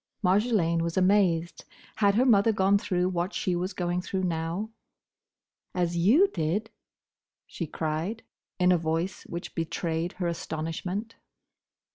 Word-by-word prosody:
Marjolaine 185 -4 +2
was 165 +1 -2
amazed. 185 -3 +2 0.3
Had 200 -2 +3
her 250 +4 +4
mother 225 -3 +5
gone 200 -1 +3
through 180 -2 0
what 180 +1 -2
she 180 -3 0
was 180 +2 -2
going 175 0 -1
through 190 +1 -3
now? 170 +5 -2 1.0
"As 175 -1 0
you 225 - +5
did—?" 180 +6 -2 0.7
she 170 - -5
cried, 160 +9 -3 0.3
in 180 -1 +4
a 175 - +4
voice 165 +3 -2
which 170 +1 -6
betrayed 165 +1 -2
her 180 - -4
astonishment. 170 +6 -4
180 Hz, 130 wpm, -27 LUFS, 165-200 Hz, 1.0 s, mother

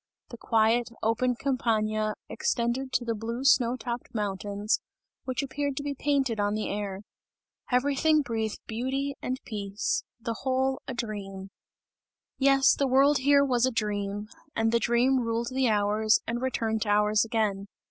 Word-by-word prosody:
The 235 - -9
quiet, 225 +1 +2
open 240 +3 +1
Campagna 215 -5 0
extended 245 +3 -1
to 245 - +1
the 230 - 0
blue 230 +3 -4
snow 250 -3 +4
topped 240 -1 -6
mountains, 205 0 -1 0.5
which 255 +2 -2
appeared 275 0 -3
to 285 - -2
be 285 0 -2
painted 270 -5 0
on 205 0 +1
the 215 - -2
air. 200 -1 -4 0.7
Everything 285 +4 +3
breathed 225 -4 -2
beauty 265 +5 -2
and 255 +1 -3
peace. 205 -2 -2 0.2
The 230 -1 -4
whole 265 0 0
a 260 - -4
dream! 195 -4 -5 0.9
Yes, 270 0 +5
the 280 - 0
world 275 +3 +4
here 280 +1 +4
was 250 -2 +2
a - - 0
dream, 205 -2 -2 0.3
and 225 0 +2
the 235 - +3
dream 245 +3 +3
ruled 230 0 -1
the 260 -1 +2
hours 210 +1 +3
and 235 +1 -3
returned 225 -4 -1
to 210 - -1
hours 210 0 +3
again. 215 -4 -1
235 Hz, 155 wpm, -28 LUFS, 215-260 Hz, 0.9 s, Yes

